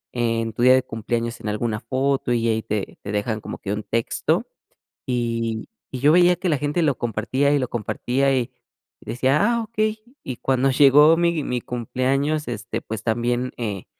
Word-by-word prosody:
en 115 -2 0
tu 120 - -4
día 130 +1 +7
de 130 - +2
cumpleaños 115 +1 -3
en 105 - -3
alguna 105 0 -2
foto, 130 +1 0
y 115 -1 +1
ahí 110 0 0
te 105 -2 -4
te 100 - -5
dejan 105 +1 -2
como - - -7
que 100 0 -3
un 105 - -4
texto, 115 +2 -1 0.6
y 115 -2 -2 0.2
y 130 - -5
yo 145 +4 +5
veía 180 0 +5
que 185 0 -1
la 150 - +2
gente 150 +4 -1
lo 145 -5 +1
compartía 120 +5 0
y 145 - +3
lo 130 - -1
compartía, 130 +4 0
y 125 -2 -1 0.5
decía: 130 +3 +1 0.2
"Ah, 235 - -1
okey", 215 -1 -2 0.2
y 130 -3 -5
cuando 135 0 +1
llegó 145 +4 +6
mi 170 -3 +1
mi 125 -1 -2
cumpleaños, 135 +6 -1
este, 120 -1 -4
pues 110 -1 -6
también, 120 +2 0
eh, 105 -6 -4
125 Hz, 185 wpm, -22 LUFS, 115-140 Hz, 0.6 s, día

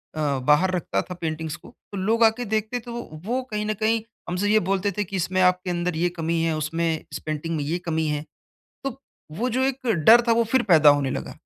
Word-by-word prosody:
अ, - - -4 0.2
बाहर 150 +8 +3
रखता 175 - -1
था 180 - -8
पेंटिंग्स 160 -2 -4
को, - - -14 0.2
तो 200 - -5
लोग 225 +5 +2
आके 225 +2 +3
देखते 220 +3 -1
थे 235 +1 -10
वो 240 0 -4 0.2
वो 250 +3 -1
कहीं 210 0 -2
ना 215 - 0
कहीं 220 +2 +1 0.3
हमसे 190 +4 0
ये 215 - +5
बोलते 195 +2 0
थे 210 - +1
कि 195 +1 -7
इसमें 185 +1 -1
आपके 180 0 +2
अंदर 175 -1 -1
ये 175 +1 +1
कमी 165 0 0
है 165 -1 +1
उसमें 165 +2 -2 0.3
इस 150 - -5
पेंटिंग 155 +2 -3
में 145 - -2
ये 165 +5 -1
कमी 160 -1 0
है। 150 0 -2 0.6
तो 270 - -1 0.5
वो 250 +3 0
जो 260 - +2
एक 270 -1 -3 0.2
डर 235 +2 +9
था - - +4
वो 230 0 +3
फिर 260 -2 +3
पैदा 160 -7 +6
होने 140 -2 +2
लगा - - -4
185 Hz, 235 wpm, -24 LUFS, 160-220 Hz, 0.6 s, डर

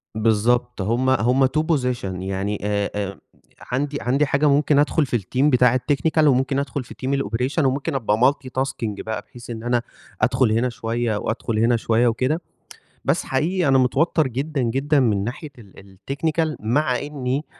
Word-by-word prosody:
بالضبط، 115 +1 +1
هم 120 +6 +1
هم 130 +1 +3
2 - - +1
position 130 -8 0 0.2
يعني 95 +2 -2
آآ 100 0 -1
آآ 100 -3 -4 0.5
عندي 145 +3 -1
عندي 135 +5 +2
حاجة 140 +2 +2
ممكن 145 0 +3
أدخُل 150 +1 +2
في 120 - 0
الteam 125 +8 -2
بتاع 125 -1 +4
الtechnical 155 +4 +1
وممكن 135 +1 +2
أدخُل 140 -1 -3
في - - -12
team - - -1
الoperation، 125 +7 -1
وممكن 140 +3 -1
أبقى 110 -4 +1
multi-tasking 130 -5 -4
بقى، 110 -2 -4
بحيث 120 +2 -14
إن 115 -1 -6
أنا 120 0 +1 0.4
أدخُل 125 -2 +2
هنا 120 +3 +1
شوية 115 -1 -2
وأدخُل 115 0 -2
هنا 115 +1 +3
شوية 115 +2 +2
وكده. 130 +8 0 0.6
بس - - +1
حقيقي 160 +4 0
أنا 135 0 +5
متوتَّر 150 +4 +2
جدًا، 135 +3 -2
جدًا 135 +5 +1
من 105 -5 +1
ناحية 140 +5 -6
ال 95 -2 -16
الtechnical، 155 +2 0
مع 125 +3 +1
إنّي 140 0 -3
125 Hz, 165 wpm, -22 LUFS, 115-140 Hz, 0.6 s, أنا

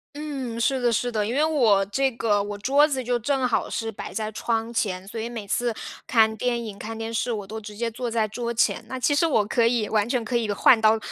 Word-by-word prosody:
嗯， 275 -6 -5
是 260 +2 +1
的 240 - +2
是 245 +2 0
的， 215 -2 0
因 235 - -2
为 295 - +3
我 235 -11 +3
这 270 +7 +1
个 215 -3 +1
我 205 0 -5
桌 275 +8 +4
子 265 -3 -2
就 245 0 0
正 260 +2 0
好 240 - 0
是 225 -1 -3
摆 205 - -8
在 215 -1 -3
窗 225 +1 -2
前， 190 -4 -2
所 220 +2 -5
以 230 - -4
每 225 -4 -7
次 240 +4 0 0.4
看 220 -2 +4
电 235 +1 -1
影、 205 -2 -8
看 225 +1 -6
电 225 0 -5
视， 235 +2 -1
我 210 -3 -3
都 220 +3 -7
直 210 0 -9
接 235 +1 -2
坐 240 +2 -4
在 225 -1 +1
桌 235 +2 -4
前。 235 0 +1
那 260 - -5
其 290 - +2
实 310 +3 +3
我 220 -9 +2
可 230 +2 +2
以 230 -3 +1
完 215 0 +1
全 245 -3 0
可 245 - -3
以 225 -3 +1
换 220 +3 +5
到 220 0 +5
230 Hz, 275 characters per minute, -24 LUFS, 215-245 Hz, 0.4 s, 换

